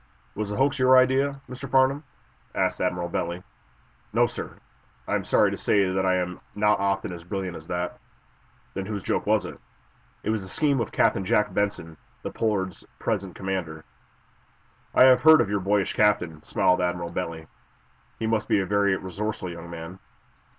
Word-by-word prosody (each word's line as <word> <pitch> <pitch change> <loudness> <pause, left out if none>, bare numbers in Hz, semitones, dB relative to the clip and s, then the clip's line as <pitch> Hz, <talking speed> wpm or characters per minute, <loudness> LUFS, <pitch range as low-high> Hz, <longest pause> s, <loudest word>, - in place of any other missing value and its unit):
"Was 105 0 -3
the 105 - -3
hoax 135 +1 +2
your 130 0 +6
idea, 135 +2 +3
Mr. 130 +2 -8
Farnum?" 135 +3 +3 0.5
asked - - 0
Admiral 90 -1 -1
Bentley. 85 +1 -3 0.7
"No, - - +4
sir; - - -6 0.5
I - - -2
am - - +1
sorry - - +3
to - - -4
say 100 -3 +2
that 95 0 0
I 95 - +3
am 90 0 -2 0.2
not 105 0 +3
often 95 -2 -1
as 85 -1 -9
brilliant 95 0 -4
as 80 0 -10
that." 90 0 -3 0.7
"Then 95 0 -4
whose 105 -3 -4
joke - - -1
was - - +2
it?" - - -8 0.6
"It 110 - 0
was 110 -2 -1
the 95 - -10
scheme 140 +4 +1
of 115 - -2
Captain 95 - +2
Jack 105 +1 +1
Benson, 100 -6 -2 0.3
the - - -4
'Pollard's' 100 -4 -2
present 95 -2 -2
commander." 90 -5 -4 1.1
"I 130 - +8
have 130 -1 +6
heard 160 +1 +8
of 100 - +1
your 100 - +1
boyish 100 +1 +1
captain," 95 -7 +1
smiled 90 - +2
Admiral 90 -1 -2
Bentley. 85 -3 -4 0.7
"He 115 - -3
must 110 -1 0
be - - +3
a 95 - 0
very 100 0 +2
resourceful 95 0 -4
young 85 0 -9
man." 85 +2 -8
95 Hz, 180 wpm, -25 LUFS, 90-110 Hz, 1.1 s, I